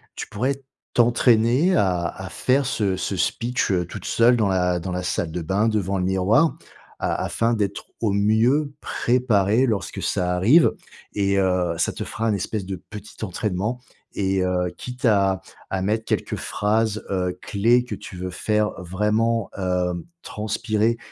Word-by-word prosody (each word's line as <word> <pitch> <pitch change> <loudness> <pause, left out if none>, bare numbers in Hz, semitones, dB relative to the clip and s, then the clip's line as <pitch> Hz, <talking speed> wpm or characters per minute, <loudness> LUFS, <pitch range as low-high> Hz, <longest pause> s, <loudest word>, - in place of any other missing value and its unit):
Tu - - -5
pourrais 130 +6 -1 0.4
t'entraîner 120 +7 +4
à 90 -3 +2
à 95 +2 -7
faire 135 +2 +1
ce 100 -7 0
ce - - -2
speech, 120 -3 0
heu, 90 -2 +1
toute - - -8
seule 120 +1 +4
dans 105 -4 +1
la 90 -1 +1
dans 90 - -4
la 90 0 -3
salle 85 -2 -2
de 90 - -3
bain 100 +7 +1
devant 100 -2 0
le 90 - -1
miroir, 95 - +2 0.4
a - - -1
afin 115 +1 0
d'être 105 -3 -2 0.2
au 110 -3 +1
mieux 115 +8 +2
préparé 120 -2 +2
lorsque 110 -6 -2
ça 90 0 0
arrive 125 - +5 0.4
et 100 -1 +1
heu, 90 -3 +1
ça 80 - 0
te - - -5
fera 115 - -3
un 110 - +2
espèce 100 +1 -3
de 95 0 -4
petit 105 +1 -9
entraînement 105 +4 -2 0.3
et 95 -1 0
heu, 90 -1 0
quitte 125 +2 -6
à 100 -3 +3 0.3
à 95 -1 -2
mettre 110 +3 0
quelques - - -2
phrases, 110 +1 0
heu, 90 -2 -1
clés 115 +4 +2
que - - -5
tu 90 - -10
veux 90 0 -4
faire 105 +4 0
vraiment, 105 +5 0
heu, 90 -2 -1 0.2
transpirer, 110 +2 -1
105 Hz, 165 wpm, -23 LUFS, 95-115 Hz, 0.4 s, arrive